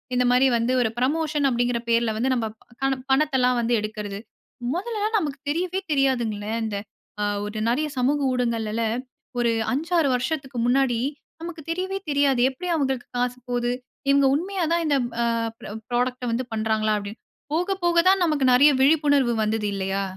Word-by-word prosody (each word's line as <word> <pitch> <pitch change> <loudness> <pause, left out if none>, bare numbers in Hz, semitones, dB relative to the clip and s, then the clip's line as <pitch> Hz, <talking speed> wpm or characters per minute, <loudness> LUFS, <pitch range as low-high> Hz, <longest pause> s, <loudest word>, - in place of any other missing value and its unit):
இந்தமாரி 250 +1 +4
வந்து 230 +2 0
ஒரு 225 - +2
ப்ரமோஷன் 300 +2 0
அப்பிடிங்கிற 240 -1 0
பேர்ல 230 -1 +2
வந்து 255 +4 0
நமக்கான 240 +4 -3
பணத்தல்லாம் 265 -3 +3
வந்து 235 +1 0
எடுக்கிறது. 210 -2 -5 0.6
மொதல 425 +3 -2
நமக்கு 290 -4 -4
தெரியவே 365 +4 -1
தெரியாதுங்களே, 235 -6 0
இந்த 210 -2 -3 0.5
அ - - +2 0.2
ஒரு 210 +1 -5
நிறைய 300 +6 +1
சமூக 285 +4 +2
ஊடகங்களுல 230 -2 -1 0.6
ஒரு 235 -1 +2 0.2
5 315 +7 -2
6 310 -4 +3
வருஷத்துக்கு 270 0 -3
முன்னாடி 245 -1 +2 0.4
நமக்கு 335 -1 -7
தெரியவே 375 +3 -2
தெரியாது. 280 -3 +2
எப்பிடி 350 +7 -6
அவுங்களுக்கு 265 -5 -1
காசு 250 0 -1
போது? 245 0 0 0.4
இவுங்க 280 0 +5
உண்மையா 370 +3 -2
தான் 340 0 +1
இந்த 290 -2 +2 0.3
அ - - +2 0.6
ப்ராடக்ட்‌ட 250 +1 -1
வந்து 245 +3 0
பண்றாங்களா? 220 -1 +1
அப்பிடின்னு. 205 +2 -7 0.3
போக 360 +5 0
போக 345 0 +2
தான் 385 -1 +4
நமக்கு 300 -5 +1
நிறைய 285 +4 +7
விழிப்புணர்வு 285 -4 +4
வந்தது 215 -1 -1
இல்லயா! 195 0 -1
255 Hz, 150 wpm, -24 LUFS, 235-300 Hz, 0.6 s, நிறைய